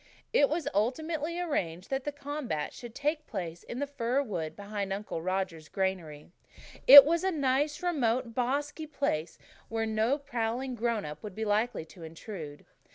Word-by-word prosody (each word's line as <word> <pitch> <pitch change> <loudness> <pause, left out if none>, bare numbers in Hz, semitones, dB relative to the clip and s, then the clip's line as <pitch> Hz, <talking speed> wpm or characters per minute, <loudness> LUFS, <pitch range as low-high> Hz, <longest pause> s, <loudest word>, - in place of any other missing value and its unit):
It 285 - +5
was 320 +1 -2
ultimately 310 - -1
arranged 185 - -2
that 270 -1 -1
the 295 - -1
combat 285 - -4
should 240 -1 -10
take 300 +2 -1
place 175 -5 -5
in 240 - -7
the 285 - -1
fir 275 -1 -1
wood 165 - -4
behind 200 -1 -4
Uncle 195 -4 -4
Roger's 185 -3 -3
granary. 175 -6 -3 0.6
It 280 +1 +13
was 335 +3 +1
a 380 - +2
nice, 290 -1 0
remote, 255 -8 0
bosky 285 +6 -1
place 165 - -1 0.3
where 225 0 -1
no 220 +5 +1
prowling 245 -1 -3
grown 230 -2 -1
up 150 0 -7
would 205 -3 -8
be 220 - -3
likely 215 -3 0
to 170 +2 -15
intrude. 160 -2 -8
230 Hz, 160 wpm, -30 LUFS, 190-285 Hz, 0.6 s, It